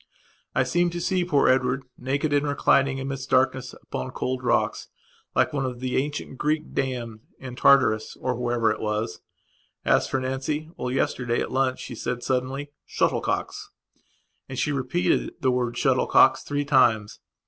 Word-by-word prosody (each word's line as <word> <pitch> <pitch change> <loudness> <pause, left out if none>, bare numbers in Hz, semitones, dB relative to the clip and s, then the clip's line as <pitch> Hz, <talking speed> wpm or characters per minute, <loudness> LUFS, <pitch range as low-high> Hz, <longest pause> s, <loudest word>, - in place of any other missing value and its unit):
I - - +4
seem 175 0 +1
to - - -2
see 180 +1 0
poor 150 -6 +2
Edward, 130 +1 +2
naked 140 +4 -1
and 145 0 +2
reclining 140 -1 +2
amidst 135 0 -5
darkness, 130 -1 +1
upon 65 - -5
cold 130 0 -3
rocks, - - 0 0.5
like - - +2
one 140 -2 -1
of 125 -2 -4
the 130 0 -2
ancient 145 -1 -3
Greek 155 +1 -1
damned, 120 -4 -3 0.2
in 130 -2 -8
Tartarus 125 -5 +3
or 130 - -1
wherever 120 -2 +1
it - - -3
was. 105 -2 -2 0.6
And - - +4
as - - +2
for 135 - -1
Nancy... 135 +4 -3
Well, 125 - -4
yesterday 125 -2 0
at - - -3
lunch 130 0 0
she 125 - -7
said 120 +1 -4
suddenly: 130 +3 -2
"Shuttlecocks!" - - -1 0.8
And 130 - -6
she 150 - 0
repeated 140 +5 0
the 130 -5 +2
word 125 -1 -1
"shuttlecocks" - - +4
three 145 0 -2
times. 110 -7 +3
130 Hz, 160 wpm, -25 LUFS, 125-140 Hz, 0.8 s, I